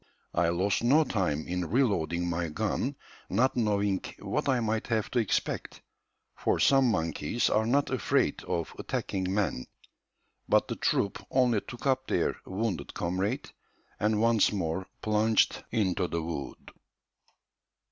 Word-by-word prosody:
I 85 -1 +2
lost 95 +6 +1
no 145 +7 +5
time 90 - -1
in 90 0 -2
reloading 90 - +1
my 85 0 -1
gun 110 - -1 0.3
not 130 +3 +2
knowing 100 -4 +1 0.2
what - - -2
I 130 -2 +3
might 110 -1 -1
have 110 -3 -1
to 125 - +2
expect, 110 - -2 0.5
for - - 0
some 135 -2 +5
monkeys 80 +2 0
are 110 +1 +2
not 140 +4 +2
afraid 130 -6 +1
of 85 -1 -2
attacking 95 -1 -2
men; 95 -11 -1 0.8
but - - +4
the - - -3
troop 100 - 0
only 125 -5 +3
took 120 - -10
up 130 -1 +1
their - - 0
wounded 95 -6 -3
comrade, 95 +10 -2 0.5
and 105 0 +2
once 115 -1 +4
more 95 -2 -2 0.2
plunged 110 +1 +2
into 95 -4 0
the 85 -1 -2
wood." 80 -4 -6
105 Hz, 135 wpm, -29 LUFS, 90-115 Hz, 0.8 s, no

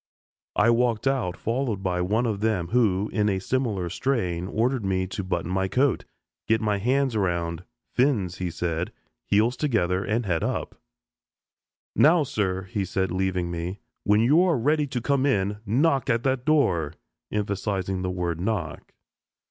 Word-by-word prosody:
I 115 +3 +4
walked 115 -1 +1
out, 130 -10 0
followed 115 -4 -2
by 90 -1 0
one 110 +7 +1
of 110 -4 -1
them, 105 -6 0
who, 105 -4 +2
in 105 -1 +2
a 95 - +1
similar 105 -3 -1
strain, 90 -4 -1
ordered 120 +3 0
me 95 -1 0
to 100 +2 -5
button 90 -2 -2
my 95 0 +1
coat, 130 +6 +1 0.4
get 110 0 +3
my 105 -2 0
hands 130 +3 +1
around 85 -3 -1 0.3
"fins" 115 - +1
he 90 -1 -1
said 85 0 -2 0.4
heels 110 +5 +3
together, 95 - 0
and 115 +1 -1
head 85 -4 0
up. - - -2 1.2
"Now, 160 +1 +5
sir," 95 -7 -2 0.2
said 95 0 -1
he, - - -3
leaving 90 -2 -1
me, 85 +3 -4 0.3
"when 105 +1 +4
you 145 +9 +5
are 180 -5 +3
ready 150 +5 +1
to 125 -3 -3
come 140 +2 +1
in, 105 -5 0
knock 135 +5 +2
at 115 -1 +1
that 130 -2 0
door," 90 - +2 0.4
emphasizing 100 -2 -2
the 90 - -2
word 90 -2 -2
"knock." 95 -6 -3
105 Hz, 160 wpm, -25 LUFS, 90-125 Hz, 1.2 s, Now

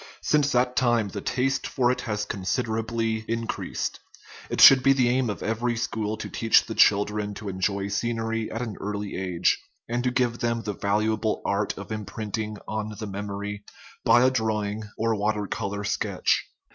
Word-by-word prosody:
Since 145 -2 +2
that 125 0 +2
time 120 -4 +2
the - - -5
taste 130 +1 0
for 125 -1 +2
it 125 - -2
has 105 -1 -1
considerably 110 +2 -1
increased. 115 0 -3 0.5
It - - -3
should 135 -1 +10
be 135 +2 +5
the 130 -3 +2
aim 125 -1 +1
at 105 - -4
every 115 +2 -1
school 110 -2 -2
to - - -5
teach 115 -1 +3
the - - -5
children 105 0 +3
to 105 0 -6
enjoy 95 +1 -1
scenery 115 +1 -1
at 115 +2 -3
an 110 -4 -5
early 105 0 -4
age, 90 -2 +1 0.3
and 120 +1 -1
to 125 - +2
give 125 -1 0
them 115 -1 -1
the 105 - -3
valuable 110 +2 0
art - - 0
of - - -8
imprinting 110 0 -4
on 110 0 -3
the 110 - -5
memory 100 0 -5 0.4
by 120 - +5
a 130 - +4
drawing 110 -3 -1 0.2
or 115 +1 +1
water 105 0 0
color 100 +1 -3
sketch. 100 - 0
110 Hz, 170 wpm, -26 LUFS, 105-120 Hz, 0.5 s, should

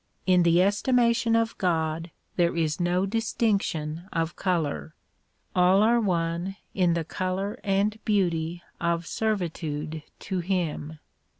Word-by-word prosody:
In 185 -1 +5
the 170 +1 +5
estimation 235 +3 +2
of 230 0 +1
God 165 -2 0 0.3
there 170 -1 +2
is 155 -3 0
no 180 +2 +1
distinction 195 -6 -1
of 165 0 -1
color; 150 - -1 0.6
all 185 +3 +5
are 235 +2 +4
one 175 -1 -1 0.2
in 180 -3 +2
the 165 -2 -1
color 190 +6 -3
and 205 +2 0
beauty 175 -5 0 0.2
of 170 0 0
servitude 160 -7 -2 0.2
to 190 -2 -2
him. 170 -4 -2
180 Hz, 120 wpm, -26 LUFS, 165-200 Hz, 0.6 s, In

